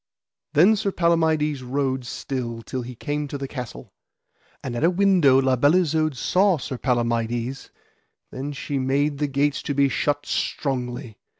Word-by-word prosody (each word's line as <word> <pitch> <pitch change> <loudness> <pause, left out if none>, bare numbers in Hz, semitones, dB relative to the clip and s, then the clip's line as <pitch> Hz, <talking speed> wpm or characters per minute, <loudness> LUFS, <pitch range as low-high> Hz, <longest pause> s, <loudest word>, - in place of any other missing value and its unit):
Then 180 +9 +6
Sir 200 -1 -1
Palamides 160 -5 +1
rode 130 0 -2
still 120 -3 -4
till 130 - -4
he 125 +1 -8
came 145 +3 -3
to 140 - -5
the 135 0 -5
castle. 125 - -8 0.7
And 125 -2 -4
at 120 - -2
a 165 - +5
window 180 -8 +4
La 130 -1 +2
Beale 145 +6 +4
Isoud 155 -2 0
saw 185 - +3
Sir 130 -2 -6
Palamides; 120 +1 -1 0.6
then 140 +3 -5
she 140 0 -3
made 140 +2 0
the 150 - +1
gates 140 +1 0
to 145 - -3
be 140 0 +3
shut 145 +2 -1
strongly. 125 -4 -3
140 Hz, 160 wpm, -23 LUFS, 125-150 Hz, 0.7 s, Then